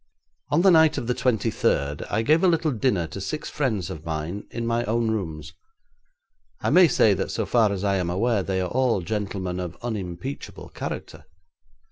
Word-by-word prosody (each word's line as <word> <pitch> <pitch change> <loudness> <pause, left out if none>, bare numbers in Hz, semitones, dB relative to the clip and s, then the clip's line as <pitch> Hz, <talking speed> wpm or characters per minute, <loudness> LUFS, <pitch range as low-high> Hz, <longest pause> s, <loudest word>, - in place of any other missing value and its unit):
'On 150 +4 +2
the 195 - +7
night 160 -2 +5
of - - -3
the 125 - 0
twenty 115 -3 0
third, 70 -7 0
I 110 +2 0
gave 155 +8 +3
a - - +6
little 165 -3 +2
dinner 110 -7 +1
to 80 +5 -7
six 150 +10 -4
friends 115 -10 -1
of 80 - -8
mine 80 +5 -4
in 120 -1 -4
my 115 0 0
own 115 0 0
rooms. 80 -7 -4 1.1
I - - -1
may 180 -1 +7
say 110 -7 +4
that 95 - -2
so - - -2
far 115 -4 +3
as 100 -1 -3
I 100 -1 +2
am 90 -2 -1
aware 105 +4 +1
they 95 0 -1
are 90 - -3
all 125 -6 +2
gentlemen 95 -2 -3
of 90 -1 -5
unimpeachable 110 +3 -5
character. - - -7
105 Hz, 190 wpm, -24 LUFS, 90-125 Hz, 1.1 s, the